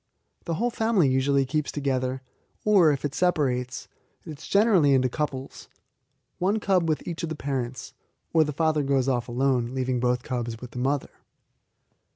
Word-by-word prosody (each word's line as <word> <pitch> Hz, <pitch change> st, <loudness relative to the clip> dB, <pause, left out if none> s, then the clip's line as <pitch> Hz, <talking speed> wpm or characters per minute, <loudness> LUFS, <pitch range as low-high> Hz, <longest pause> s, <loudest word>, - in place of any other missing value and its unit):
The 165 Hz, -, -2 dB
whole 240 Hz, +7 st, 0 dB
family 220 Hz, -9 st, +2 dB
usually 135 Hz, +1 st, +2 dB
keeps 150 Hz, +2 st, -2 dB
together, 130 Hz, -2 st, -2 dB, 0.4 s
or, 195 Hz, -7 st, +5 dB
if 140 Hz, 0 st, -2 dB
it 140 Hz, -, -3 dB
separates, 130 Hz, -8 st, 0 dB, 0.4 s
it 150 Hz, -3 st, -8 dB
is -, -, -10 dB
generally 195 Hz, -9 st, +4 dB
into 130 Hz, -1 st, +2 dB
couples 135 Hz, -1 st, -5 dB, 0.7 s
one 200 Hz, +5 st, +1 dB
cub 185 Hz, -5 st, +1 dB
with 155 Hz, -, -2 dB
each 170 Hz, -1 st, -4 dB
of 165 Hz, -, -3 dB
the 160 Hz, -, -3 dB
parents; 130 Hz, -3 st, -4 dB, 0.4 s
or 160 Hz, -1 st, +5 dB
the 150 Hz, -, -3 dB
father 155 Hz, +1 st, +1 dB
goes 135 Hz, -2 st, +1 dB
off 125 Hz, -3 st, 0 dB
alone, 125 Hz, 0 st, 0 dB
leaving 130 Hz, -1 st, -1 dB
both 125 Hz, 0 st, 0 dB
cubs 120 Hz, -4 st, -4 dB
with 125 Hz, -1 st, -9 dB
the 125 Hz, -, -6 dB
mother. 135 Hz, +2 st, -1 dB
140 Hz, 170 wpm, -26 LUFS, 130-160 Hz, 0.7 s, or